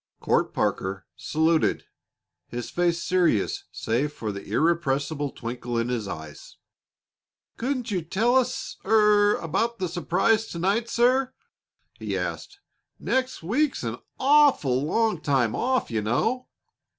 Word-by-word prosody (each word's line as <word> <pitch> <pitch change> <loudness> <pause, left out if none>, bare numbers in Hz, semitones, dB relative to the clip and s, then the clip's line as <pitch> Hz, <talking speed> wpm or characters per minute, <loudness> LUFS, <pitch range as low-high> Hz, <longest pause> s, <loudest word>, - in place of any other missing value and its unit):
Court - - +1
Parker 95 0 -2
saluted, 160 +1 +1 0.6
his 120 -1 -6
face 170 -1 0
serious 175 - +1
save 130 +7 -1
for 115 -7 -5
an 100 - -4
irrepressible 145 +4 0
twinkle 120 -1 -5
in 115 +1 0
his 115 -5 -2
eyes. 80 -3 -9 1.0
"Couldn't 250 -1 -2
you 190 - +1
er - - -6
tell 215 +10 +1
us 260 -2 0
about 210 0 +3
the 185 - -2
surprise 195 +6 +1
to 170 - -7
night, 200 +7 0
sir?" 255 +2 +2 0.6
he - - -3
asked. 400 0 -5 0.4
"Next 260 -7 -1
week's 265 - 0
an - - -3 0.2
awful 265 - +4
long 215 +2 +1
time 130 -7 +1
off, 255 - 0
you 110 -2 0
know." 225 - 0
170 Hz, 125 wpm, -25 LUFS, -, 1.0 s, awful